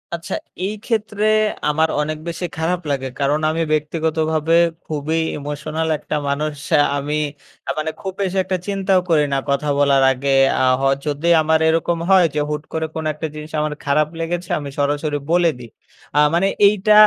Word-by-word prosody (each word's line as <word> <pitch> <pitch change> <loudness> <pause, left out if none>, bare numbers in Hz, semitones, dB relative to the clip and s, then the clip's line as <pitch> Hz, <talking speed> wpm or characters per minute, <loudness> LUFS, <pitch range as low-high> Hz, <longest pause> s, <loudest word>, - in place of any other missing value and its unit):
আচ্ছা 170 - -5 0.3
এই 205 - -2
ক্ষেত্রে, 215 -2 -1 0.4
আমার 160 +2 +2
অনেক 155 +1 -2
বেশি 170 +1 -3
খারাপ 175 +3 -1
লাগে। 135 -1 -1
কারণ 145 +2 +1
আমি 165 +1 -1
ব্যক্তিগতভাবে 160 +1 0 0.3
খুবই 155 +1 -1 0.2
ইমোশনাল 150 +2 -3
একটা 150 - -4
মানুষ। 150 +1 -1 0.2
আ - - +7 0.2
আমি 145 +2 -2 0.5
আ - - +2
মানে 155 +1 -1
খুব 190 -1 -4
বেশি 195 -1 -1
একটা 185 - -1
চিন্তাও 195 -1 +2
করি 155 -3 +4
না 135 - +2
কথা 140 +2 0
বলার 140 -1 +4
আগে। 135 +2 -2 0.3
আ - - +3 0.2
হ - - -3 0.2
যদি 150 +3 -1
আমার 160 +1 +2
এরকম 165 +1 +1
হয় 190 -2 +6
যে - - +1
হুট 150 0 -3
করে 160 0 -1
কোন 160 - -3
একটা 150 +2 -4
জিনিস 150 +1 -8
আমার 150 0 -1
খারাপ 150 +2 +2
লেগেছে, 170 +1 -3
আমি 145 -1 -6
সরাসরি 145 +1 0
বলে 175 -1 +4
দিই। 120 -2 -10 0.5
আ - - +6
মানে 175 +3 +3 0.2
এইটা 210 +1 +3
155 Hz, 175 wpm, -20 LUFS, 150-170 Hz, 0.5 s, আ